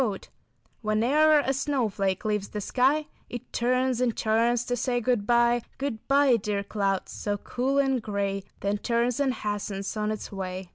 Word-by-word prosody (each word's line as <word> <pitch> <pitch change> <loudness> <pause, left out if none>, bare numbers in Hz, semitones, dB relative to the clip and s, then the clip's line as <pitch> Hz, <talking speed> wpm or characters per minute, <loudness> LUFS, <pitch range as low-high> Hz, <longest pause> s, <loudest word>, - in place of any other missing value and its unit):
Elaborately 215 -6 +1
etched] - - -18 0.5
"When 215 0 +1
e'er 305 +4 +5
a 270 - 0
snowflake 225 -10 -1
leaves 210 -2 0
the 210 - -5
sky 270 +8 +2 0.2
It 245 +1 -8
turns 255 +1 +1
and 240 -3 +1
turns, 230 +2 +2
to 245 - -1
say 245 +1 0
good 240 -3 0
bye. 240 0 +4 0.2
Good 265 -6 -4
bye, 275 -3 +5
dear 205 -1 -2
clouds, 195 -1 -1
so 205 -1 -2
cool 255 +6 -1
and 270 -3 +2
gray, 200 -2 -2 0.2
Then 200 +1 0
turns 235 +2 0
and 275 -2 +2
hastens 205 -3 -3
on 210 0 -1
its 215 -1 -4
way. 185 -2 -5
235 Hz, 180 wpm, -27 LUFS, 205-255 Hz, 0.5 s, e'er